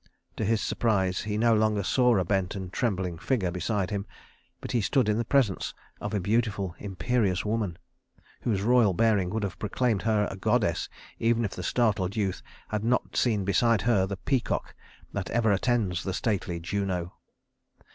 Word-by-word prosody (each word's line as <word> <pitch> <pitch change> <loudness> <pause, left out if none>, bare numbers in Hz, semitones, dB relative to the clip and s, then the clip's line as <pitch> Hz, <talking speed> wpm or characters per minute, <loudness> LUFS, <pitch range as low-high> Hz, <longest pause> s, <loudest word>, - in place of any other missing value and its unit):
To - - -1
his 110 +1 +1
surprise 95 -5 +1
he 105 0 -2
no 115 +1 +4
longer 105 -2 +2
saw 125 +2 +3
a 95 - +1
bent 95 +1 0
and 95 -2 -6
trembling 95 -8 -1
figure 105 -10 0
beside 95 +2 -1
him, 100 0 -3 0.5
but - - -6
he 120 - +2
stood 125 +3 +2
in 105 +1 +2
the - - +1
presence 115 -5 +1 0.2
of - - -3
a - - +1
beautiful, 100 -2 0
imperious 100 0 0
woman, 105 -5 -1 0.6
whose 100 -5 0
royal 115 -5 +4
bearing 105 -4 +2
would 110 +2 -2
have 100 -3 -4
proclaimed 110 0 0
her 105 -1 +2
a - - -5
goddess 95 - +1 0.3
even 115 0 +2
if 100 - -3
the - - -6
startled 100 -2 +1
youth 100 -4 -1 0.3
had 105 -1 -2
not 125 +2 0
seen 105 -6 +1
beside 105 +1 +3
her 100 -5 +3
the 100 0 -4
peacock 125 +7 -1 0.4
that - - -3
ever 115 -2 +2
attends 100 -4 +1
the 95 -1 -2
stately 100 -6 -1
Juno. 90 0 -2
105 Hz, 175 wpm, -27 LUFS, 95-115 Hz, 0.6 s, no